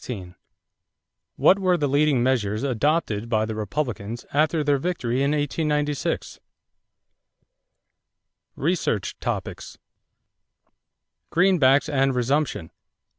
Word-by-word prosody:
What 195 - +4
were 185 -2 +2
the 145 -3 0
leading 140 -2 +2
measures 110 -4 0
adopted 125 -4 0
by 110 -1 +1
the 110 - -4
Republicans 115 0 -4
after 155 +2 +2
their 145 -1 +2
victory 130 -7 -2
in 140 +1 +1
1896? 150 0 -1 2.2
=Research 150 - -1
Topics= - - -5 1.5
=Greenbacks 160 -7 +4
and 135 -3 +1
Resumption. 125 - -1
140 Hz, 85 wpm, -24 LUFS, 120-150 Hz, 2.2 s, What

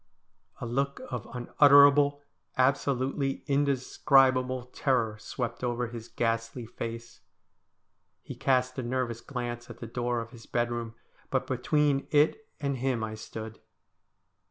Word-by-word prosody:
A - - -4
look 140 +4 -1
of 125 -4 -4
unutterable, 145 +3 +5 0.3
absolutely 135 +1 +1
indescribable, 130 -2 +2
terror 120 -4 0
swept 125 +2 -5
over 120 -1 -1
his 115 -1 -8
ghastly 115 +1 -2
face. 115 +1 -7 1.0
He - - -7
east 130 0 +1
a - - 0
nervous 120 -1 -2
glance 120 -3 -5
at 120 - -9
the 120 - -7
door 120 +1 -2
of 115 0 -7
his 115 -3 -13
bedroom, 120 -1 -2 0.3
but 130 - 0
between 140 +2 +1
it 155 - +2
and 140 -2 -1
him 125 -2 -1
I 110 0 -4
stood. 110 0 -8
125 Hz, 125 wpm, -29 LUFS, 120-135 Hz, 1.0 s, unutterable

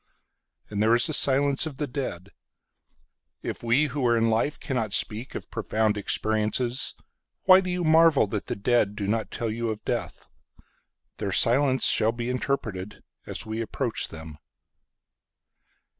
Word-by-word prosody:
And 105 0 -2
there 110 +2 +4
is 120 - +3
the 160 - -1
silence 140 +1 +3
of 145 -4 -8
the 150 - -2
dead. 120 - -6 1.1
If - - -5
we 120 +5 +2
who 140 -1 -3
are 120 0 +3
in 115 0 +2
life 115 +7 0
cannot 115 -7 -3
speakOf 115 +4 -1
profound 110 -1 0
experiences, 110 +4 0 0.5
Why 185 0 +7
do 185 - -5
you 180 0 -2
marvel 160 -4 +5
that 105 0 -5
the - - -2
deadDo 105 -2 0
not 110 +1 -1
tell 115 -2 -3
you 115 +1 -3
of 110 -1 -5
death? - - -4 0.9
Their 100 -2 -3
silence 130 +6 +3
shall 110 +1 +3
be 120 +1 -3
interpretedAs 110 -7 -5
we 110 +1 -4
approach 115 +1 -2
them. 80 -2 -11
115 Hz, 145 wpm, -25 LUFS, 110-135 Hz, 1.1 s, Why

